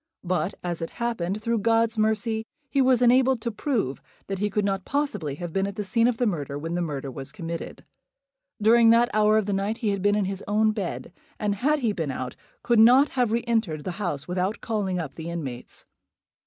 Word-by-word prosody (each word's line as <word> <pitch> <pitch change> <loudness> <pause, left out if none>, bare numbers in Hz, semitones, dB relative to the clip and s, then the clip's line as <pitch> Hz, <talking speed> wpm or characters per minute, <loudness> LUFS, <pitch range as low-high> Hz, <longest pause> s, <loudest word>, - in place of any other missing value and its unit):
But, 185 +1 -1
as 175 -1 -3
it 165 - -3
happened, 215 -4 -2
through 230 0 +1
God's 225 +1 +2
mercy, 220 +1 0 0.3
he 275 - +3
was 255 -2 +4
enabled 255 +1 +4
to 235 - -2
prove 220 - -2 0.2
that 195 -1 -4
he 210 +1 0
could 205 +1 0
not 195 -1 -1
possibly 210 - -2
have 175 +1 -6
been 195 0 +1
at 200 - -6
the 210 - -3
scene 230 +4 +2
of 245 -2 0
the 245 - +1
murder 145 - -2
when 165 +3 -4
the 175 - -1
murder 140 -5 -4
was 135 +1 -8
committed. 170 -4 -6 0.7
During 225 +2 +6
that 235 +2 +5
hour 215 0 +4
of 215 - +1
the 205 - -1
night 200 +3 -1
he 225 -4 -1
had 200 -1 -1
been 205 +1 +3
in 210 -2 +1
his 195 +1 -4
own 215 +1 +3
bed; 200 -4 -5 0.2
and, 210 -1 0
had 285 +9 +1
he 225 -4 +1
been 160 -7 -3
out, 130 -1 -4 0.3
could 235 -2 +3
not 255 +6 +7
have 245 -4 0
re 235 +1 0
entered 220 -11 0
the 185 - -3
house 145 -7 -3
without 185 +4 -1
calling 205 -5 -2
up 160 -6 -4
the 165 0 -7
inmates. 140 -8 -7
205 Hz, 220 wpm, -25 LUFS, 175-230 Hz, 0.7 s, not